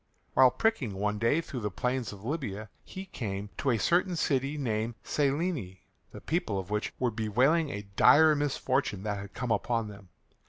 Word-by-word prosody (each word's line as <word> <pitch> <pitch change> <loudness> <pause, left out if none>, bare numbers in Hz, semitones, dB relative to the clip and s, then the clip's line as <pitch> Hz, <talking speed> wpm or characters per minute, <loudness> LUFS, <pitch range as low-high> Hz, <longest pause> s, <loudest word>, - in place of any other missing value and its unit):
While 130 -1 +7
pricking 130 - 0
one 105 +2 -1
day 115 +9 +2
through 140 -6 -6
the 105 -2 -2
plains 125 +4 -2
of 100 0 -11
Libya 110 -8 -4
he 190 +1 -8
came 100 - -5
to 140 - 0
a 120 - +3
certain 175 - +2
city 140 -2 0
called 115 -4 -2
Silene, 140 - -1 0.3
the - - -10
people 155 - -1
of 95 +1 -5
which 105 0 -1
were 125 -2 0
bewailing 125 +9 +2
a 100 -3 -5
dire 155 +8 +7
misfortune 135 -7 -1
that 105 -2 -2
had 100 0 -9
come 120 0 -3
upon 115 0 0
them. 100 -2 -13
120 Hz, 175 wpm, -29 LUFS, 105-145 Hz, 0.3 s, While